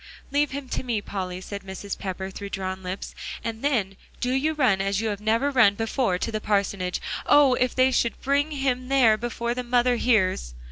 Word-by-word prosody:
"Leave 290 +1 +2
him 280 0 -6
to - - -2
me, 240 -4 -1
Polly," 185 -3 -5
said 200 +2 -7
Mrs. 195 +1 -6
Pepper, 190 0 -5
through 200 +1 -7
drawn 190 -1 -4
lips, 185 +1 -5 0.3
"and 225 -1 -4
then 220 -10 0 0.2
do 250 - -1
you 295 +4 +1
run 235 -10 +3
as 195 0 0
you 225 0 -1
have 205 -1 -4
never 230 +6 +1
run 225 -7 +5
before, 225 -3 0
to 230 - -3
the 215 -1 -3
parsonage. 200 -3 0 0.3
Oh! 290 -3 +6
if 250 -1 0
they 260 0 +4
should 235 -2 0
bring 280 +2 +1
him 265 -3 -1
there 255 -5 +5
before 235 +1 -3
the 250 - -3
mother 245 0 +2
hears." 185 - +1
225 Hz, 200 wpm, -25 LUFS, 195-255 Hz, 0.3 s, Oh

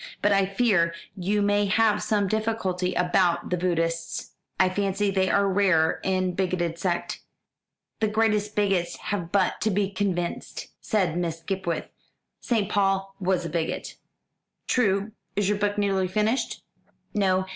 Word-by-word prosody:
But 205 - +4
I 195 -1 +3
fear 195 -5 +2 0.2
you 200 +3 0
may 205 0 +2
have 210 +2 +3
some 205 -2 +1
difficulty 190 -4 -1
about 180 0 +1
the - - +3
Buddhists. 165 -2 -2 0.3
I 185 - +5
fancy 200 +1 0
they 190 -1 +1
are 200 0 +3
rather 185 -5 +3
a 185 -1 +1
bigoted 175 -2 -1
sect." 175 -2 -2 0.8
"The 220 - +2
greatest 210 -1 +1
bigots 195 -4 +1
have 175 -5 -4
but 195 -2 +1
to 220 - +2
be 200 -1 0
convinced," 185 -3 -3
said 190 -7 0
Miss 165 -2 -3
Skipwith. 180 -1 -2 0.5
"St. 220 -5 0
Paul 195 -1 +1
was 185 -2 0
a - - -3
bigot." 165 0 -3 0.7
"True. 205 -3 +1 0.2
Is 200 -1 +1
your 210 -1 0
book 205 0 0
nearly 195 -2 +1
finished?" 215 +7 -1 0.5
"No. 190 -2 +2
195 Hz, 145 wpm, -26 LUFS, 180-205 Hz, 0.8 s, I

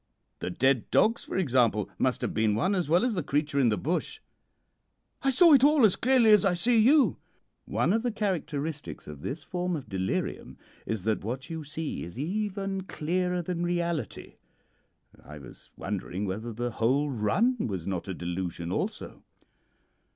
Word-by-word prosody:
The - - -3
dead 130 +5 +1
dogs, 225 +2 +3
for - - -4
example, 125 - +2
must 130 -1 +1
have - - -2
been 110 -1 +2
one 185 - +1
as 180 -6 -1
well 175 +8 +4
as 250 - 0
the 180 - -1
creature 145 0 -1
in 125 -4 +4
the 105 - 0
bush.' 175 +5 -2 1.0
"'I 270 - +2
saw 315 +5 +6
it 270 -2 +6
all 290 -4 +6
as 200 - +4
clearly 245 -3 +4
as 210 -3 +6
I 190 -2 +2
see 225 +6 +3
you.' 275 +6 +4 0.5
"'One - - +1
of 225 - +1
the 245 0 -1
characteristics 160 -8 -3
of 75 -2 -9
this 145 - -5
form 180 +2 -2
of 145 - -7
delirium 95 -1 -3 0.3
is 110 -4 -3
that 110 -1 -1
what 130 +8 -5
you 160 -1 -5
see 155 +1 -5
is 85 +6 -9
even 195 +4 -2
clearer 180 +2 -1
than 175 0 -3
reality. 170 -2 -3 0.9
I 75 - -10
was 70 -4 -14
wondering 95 0 -4
whether 110 +5 -4
the 120 +2 -3
whole 135 +6 +1
run 200 - +1
was 95 -6 -4
not 95 -2 -3
a 95 - -4
delusion 85 -1 -4
also.' - - -4
155 Hz, 175 wpm, -28 LUFS, -, 1.0 s, saw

